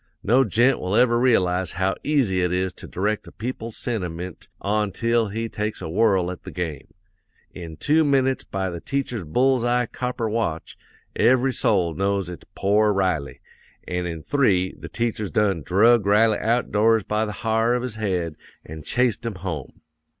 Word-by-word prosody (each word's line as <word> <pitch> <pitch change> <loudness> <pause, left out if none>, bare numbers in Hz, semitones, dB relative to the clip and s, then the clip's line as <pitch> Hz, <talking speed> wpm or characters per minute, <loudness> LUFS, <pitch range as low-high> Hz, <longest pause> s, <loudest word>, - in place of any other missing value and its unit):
No 125 +5 +4
gent 120 +4 +2
will 95 +3 -2
ever 120 0 +4
realize 95 -7 +2
how 95 +2 0
easy 125 -12 +1
it 90 0 0
is 90 0 -1
to - - -9
direct 105 +3 -2
a - - -11
people's 115 -1 -5
sentiment 90 -6 -5
ontil 110 +3 0
he 115 +2 -3
take 105 0 -3
a 85 - -5
whirl 95 0 +2
at 90 - -8
the - - -9
game. 80 -6 -5 0.7
In 80 -3 -8
two 155 - +3
minutes 135 -2 +2
by 95 -1 -3
the 85 -1 -6
teacher's 130 -6 -3
bull's 125 - +2
eye 120 0 +2
copper 125 -1 -3
watch, 105 -8 -2 0.4
every 130 +3 +3
soul 90 -9 +1
knows 100 +1 -1
it's 85 -5 -10
pore 105 +2 +3
Riley; 90 -9 -1 0.5
an' 90 0 -2
in 80 -2 -6
three, 95 -10 +2
the - - -10
teacher's 115 -4 -2
done 100 -6 +1
drug 105 +6 +4
Riley 105 +1 +4
out 120 +2 0
doors 110 +1 +3
by 105 +2 0
the 105 - -5
ha'r 115 +2 +2
of 125 - -2
his 125 -3 -3
head 90 -7 -2 0.3
an' 80 +1 -8
chased 120 - 0
him 115 -3 -4
home. 85 -7 -6
105 Hz, 170 wpm, -23 LUFS, 90-120 Hz, 0.7 s, No